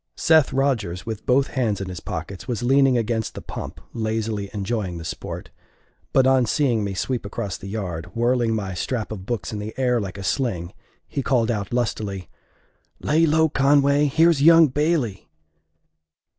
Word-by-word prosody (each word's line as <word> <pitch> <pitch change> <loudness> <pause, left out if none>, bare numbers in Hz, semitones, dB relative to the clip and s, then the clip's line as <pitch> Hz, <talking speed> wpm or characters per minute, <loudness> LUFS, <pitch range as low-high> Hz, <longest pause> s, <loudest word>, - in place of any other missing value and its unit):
Seth 160 -3 +4
Rodgers, 115 -10 -1
with 110 -2 -6
both 135 +2 +3
hands 115 -6 -1
in 95 - -4
his 90 -2 -6
pockets, 100 +3 -6
was 120 -3 -3
leaning 135 0 +4
against 115 -1 -2
the - - -5
pump - - -7
lazily 110 -2 -2
enjoying 100 -3 -3
the 85 - -8
sport; 80 - -6 0.6
but 130 - +4
on 130 -2 +4
seeing 120 -4 +1
me 100 -1 -3
sweep 125 +5 -2
across 100 -1 -4
the 95 - -9
yard, 95 -6 -4
whirling 120 -1 +1
my 100 -3 -3
strap 110 +4 -3
of 95 -3 -7
books 115 -4 -3
in 105 - -4
the 105 +1 -6
air 125 -3 +2
like 100 -1 -6
a 100 - -6
sling, 95 - -1 0.3
he 140 - -3
called 120 -4 +1
out 100 -3 -3
lustily, 105 -6 -2 0.7
"Lay 160 +3 +2
low, 160 +1 +4
Conway! 140 0 +3
Here's 160 +1 +3
young 165 0 +7
Bailey!" 145 - -1
115 Hz, 170 wpm, -23 LUFS, 100-135 Hz, 0.7 s, young